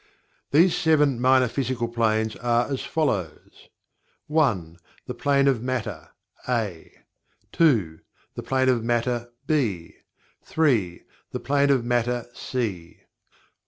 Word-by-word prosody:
These 170 +5 +4
Seven 150 -5 +2
Minor 130 0 +4
Physical 125 -1 -2
Planes 110 -2 0
are 120 0 +1
as 135 - -2
follows: 105 - -3 0.6
1. 105 - 0 0.3
The - - -5
Plane 140 -1 +2
of 130 -5 +2
Matter 110 -10 -4 0.4
(A) 105 -9 -2 0.6
2. 105 - +2 0.3
The - - -6
Plane 130 -1 +1
of 120 -3 +1
Matter 120 0 -1 0.2
(B) 110 - -1 0.5
3. 115 - 0 0.3
The - - -5
Plane 140 +1 +1
of 130 -4 +2
Matter 120 0 0
(C) 100 -11 -4
4. - - -35
120 Hz, 120 wpm, -24 LUFS, 110-140 Hz, 0.6 s, These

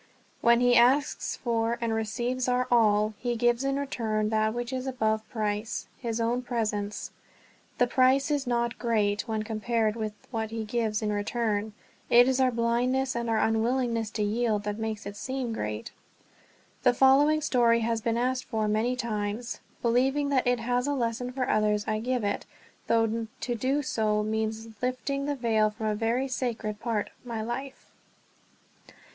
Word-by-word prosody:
When 235 +1 +5
he 245 0 +5
asks 260 +4 +3
for 230 -1 0
and 230 -1 -1
receives 240 +3 -1
our 250 0 +1
all, 215 -2 +4
he 240 -1 -1
gives 240 +2 +2
in 275 0 0
return 220 -6 -1
that 215 0 +2
which 240 +2 -4
is 260 0 -3
above 220 -4 -1
price 215 0 -2
his 230 -2 -3
own 235 +2 0
presence. 215 -4 -3 0.7
The 245 - +4
price 260 +3 +3
is 285 -3 0
not 235 -1 0
great 210 -2 +1
when 220 -1 -1
compared 220 0 0
with 215 -2 -3 0.2
what 220 -2 -2
he 225 0 -4
gives 220 -1 -1
in 210 -1 0
return; 210 0 -1 0.4
it 245 +1 +7
is 260 0 +2
our 260 -1 +4
blindness 250 +3 0
and 235 -1 -2
our 225 - +2
unwillingness 230 +1 +1
to 210 - +1
yield 215 0 0
that 210 +1 -3
make 220 -1 -3
it 200 0 -6
seem 255 +1 -3
great. 105 - -4 0.9
The 250 -1 +4
following 280 +4 +5
story 240 -6 +3
has 230 0 0
been 230 +1 0
asked 255 +1 0
for 220 -3 -1
many 220 +4 +1
times. 220 -1 -3 0.2
Believing 265 +5 +2
that 260 -3 +1
it 245 -1 +2
has 245 +3 0
a 285 - 0
lesson 245 0 -2
for 255 -1 -2
others, 210 -1 +2
I 215 0 0
give 250 0 -1
it, 205 0 -2 0.4
though 225 0 +1
to 245 - -1
do 265 +5 0
so 215 -4 0
means 220 +1 -2
lifting 275 +3 -2
the 290 - 0
veil 225 -4 +2
from 220 +1 -6
a 215 - +1
very 230 +5 0
sacred 230 -5 -3
part 225 -3 -2
of - - -33
my 230 -3 -4
life. 265 +4 -6
235 Hz, 170 wpm, -28 LUFS, 220-250 Hz, 0.9 s, it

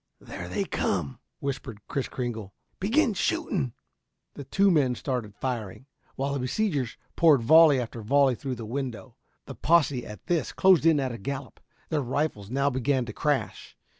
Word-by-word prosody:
"There - - -8
they - - -1
come," 70 - -2 0.2
whispered 130 -5 -5
Kris 135 - -2
Kringle. 115 -6 -5 0.2
"Begin 230 +5 +2
shooting!" 190 - -1 0.6
The 140 - -8
two 195 +7 +3
men 135 -7 +3
started 120 -6 -4
firing, 115 -2 -4 0.3
while 140 +1 -2
the 140 - -1
besiegers 135 - -1 0.2
poured 155 -8 +5
volley 155 +1 +7
after 115 -1 -5
volley 135 +4 +3
through 130 +1 -4
the 115 -1 -7
window. 125 -1 -5 0.3
The - - -7
posse 145 -6 +2
at 105 - -10
this, 170 -3 -1
closed 185 -4 +5
in 160 -3 +5
at 130 -2 -1
a 115 - -7
gallop. 135 +5 -6 0.3
Their 155 -3 0
rifles 125 -6 -2
now 140 +3 +1
began 130 0 0
to 110 - -7
crash. 130 -10 -2
135 Hz, 165 wpm, -27 LUFS, 120-150 Hz, 0.6 s, volley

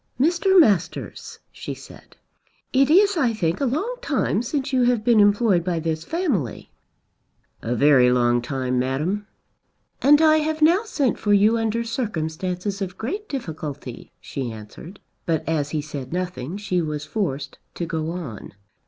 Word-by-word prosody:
"Mr. 350 +6 +4
Masters," 195 - +1
she - - -7
said, - - -15 0.6
"it 270 +1 +4
is 395 +4 +5
I 250 -7 +2
think 170 -2 -1
a - - +2
long 385 - -2
time - - 0
since 275 +2 -3
you 255 - +3
have 240 -3 +2
been 235 -2 +4
employed 205 -3 +4
by 175 -1 -1
this 160 0 -2
family." 260 - -2 0.9
"A 120 +2 -2
very 130 -2 +5
long 120 -1 +2
time, 130 0 -2
Madam." 155 +11 -1 0.7
"And 290 +2 +6
I 315 -1 +5
have 310 0 -1
now 335 +6 +5
sent 280 - 0
for 205 - +1
you 210 +3 +5
under 225 0 0
circumstances 190 - -3
of 190 -1 -4
great 400 - -4
difficulty," 150 - -6
she 130 -4 -5
answered; 110 - -11 0.3
but 160 -2 -1
as 150 -3 0
he 150 -1 -2
said 140 -4 -7
nothing 180 -2 -4
she 185 -4 -1
was 150 -2 -4
forced 150 -6 -3 0.2
to 170 - -3
go 160 -1 -3
on. 155 - -7
185 Hz, 155 wpm, -23 LUFS, -, 0.9 s, And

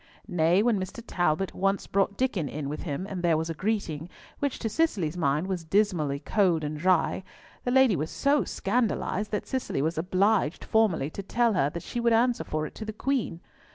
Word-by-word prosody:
Nay, 175 +1 +3
when 230 -4 +2
Mr. 190 +5 -6
Talbot 175 -1 0
once 195 +1 0
brought 195 0 0
Diccon 210 - 0
in 145 0 -4
with 150 - -4
him, 150 +2 -3
and 190 -3 -4
there 170 -2 +3
was 160 +1 -2
a - - -2
greeting, 175 -4 -2 0.3
which 285 -2 -1
to 225 - -3
Cicely's 210 - 0
mind 150 -1 +1
was 185 -3 -3
dismally 165 -6 +1
cold 170 +1 +1
and 150 +1 -3
dry, 185 +2 +2 0.4
the - - +1
lady 260 -4 +5
was 155 0 -2
so 285 0 +2
scandalised 210 -2 -1
that 210 - -2
Cicely 260 - -2
was 160 +3 0
obliged 185 -1 +1
formally 190 -10 +2
to 200 - -5
tell 230 +3 +1
her 145 -7 +2
that 170 +3 -6
she 240 - -4
would 235 -1 +3
answer 240 +2 +2
for 155 0 -2
it - - -8
to - - -5
the 220 0 -5
Queen. 235 -8 -1
190 Hz, 200 wpm, -27 LUFS, 160-220 Hz, 0.4 s, lady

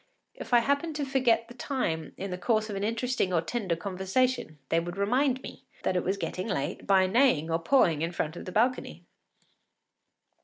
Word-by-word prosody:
If - - -9
I 240 -1 +6
happened 285 +5 0
to 295 -1 -1
forget 255 -4 +2
the 240 - -11
time 240 - -3
in 195 0 -5
the 180 - -3
course 215 +3 +1
of - - -4
an 195 - -3
interesting 230 -2 0
or 175 - +3
tender 185 +1 -2
conversation 190 +1 -1
they 165 - +3
would 175 +2 -5
remind 255 +6 +1
me - - -10 0.2
it 180 -1 +1
was 190 +2 -1
getting 185 0 -4
late 170 -4 -3
by 190 -1 +5
neighing 185 - +3
or 165 - +1
pawing 165 - +3
in 165 +1 -1
front 160 -2 -3
of - - -8
the 185 - -6
balcony. 245 +6 0
200 Hz, 190 wpm, -28 LUFS, 175-250 Hz, 0.2 s, I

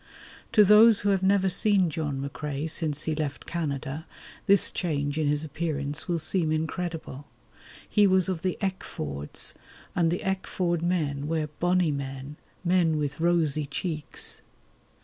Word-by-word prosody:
To 210 - +7
those 210 +2 +7
who 205 - +1
have 195 -2 +2
never 195 0 +3
seen 190 -2 +3
John 145 -3 -3
McCrae 150 +1 -4
since 155 -2 0
he 160 - -1
left 150 -2 -3
Canada 150 -2 -4 0.4
this 200 0 +5
change 145 -3 -1
in 155 - +1
his 145 +1 0
appearance 150 -1 -3
will 175 -2 0
seem 160 0 0
incredible. 160 -3 -3 0.6
He 205 -2 +4
was 185 -2 +3
of 185 -4 -2
the 185 0 -1
Eckfords, 75 - -4 0.4
and 170 -2 +3
the 175 - -2
Eckford 185 -3 -1
men 150 -5 -1
were 155 -1 -1
"bonnie 175 -2 +2
men", 135 +1 -5 0.3
men 170 -3 +3
with 150 0 -2
rosy 160 -4 +1
cheeks. 155 +1 -4
160 Hz, 145 wpm, -27 LUFS, 145-180 Hz, 0.6 s, To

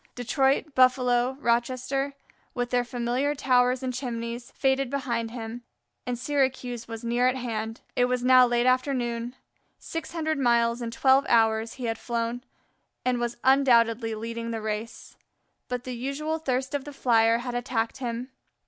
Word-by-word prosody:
Detroit, 270 +4 +1
Buffalo, 255 0 +3
Rochester, 255 +3 0 0.4
with 245 -1 -2
their 245 -1 +2
familiar 245 +4 -1
towers 250 -1 +2
and 255 -1 -2
chimneys, 235 -1 -4
faded 270 -1 0
behind 240 -4 -2
him, 230 0 -6 0.5
and 245 -1 -1
Syracuse 255 -3 -1
was 225 0 -7
near 240 +2 +2
at 255 - +2
hand. 225 -3 -4
It 245 - +3
was 250 0 -1
now 255 0 +7
late 240 0 +1
afternoon; 250 -2 0 0.4
six 330 -1 -6
hundred 315 -2 -1
miles 235 -1 +2
in 235 - -3
twelve 265 +4 +3
hours 225 -1 +3
he 255 - -6
had 225 -1 -2
flown 235 0 -3 0.6
and 250 -1 +1
was 240 0 -2
undoubtedly 235 -4 +4
leading 230 +1 -5
the 225 -1 -3
race; 215 +1 -5 0.5
but 250 -1 -3
the 255 - -5
usual 285 +6 -3
thirst 265 -2 -2
of 285 -2 -1
the 290 - -9
Flyer 230 -3 +3
had 245 +1 -5
attacked 245 -1 -2
him. 245 0 -4
245 Hz, 155 wpm, -26 LUFS, 235-260 Hz, 0.6 s, now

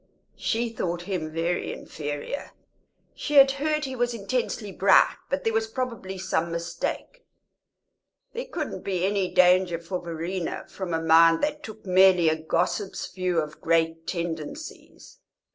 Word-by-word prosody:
She 235 +1 0
thought 175 -6 -3
him 175 -5 -3
very 165 +2 -1
inferior; 145 - -6 0.6
she 295 - -4
had 275 -1 +8
heard 300 +2 -1
he 265 -1 -5
was 240 -1 0
intensely 220 -1 -2
bright, 190 +1 +5
but 280 +1 -1
there 225 - 0
was 220 0 +1
probably 225 -6 -4
some 170 -2 -1
mistake; 170 - -4 1.1
there 485 +1 -4
couldn't - - -4
be 185 -2 -1
any 195 -2 0
danger 180 -1 +4
for 170 +2 -5
Verena 170 +1 -4
from 180 -4 -4
a - - 0
mind 165 +1 +6
that 300 0 -1
took 220 -5 -10
merely 185 -2 +5
a 155 - +2
gossip's 175 +5 -2
view 180 -1 -1
of 150 -1 -5
great 165 0 +1
tendencies. 175 - -6
185 Hz, 145 wpm, -26 LUFS, 165-225 Hz, 1.1 s, had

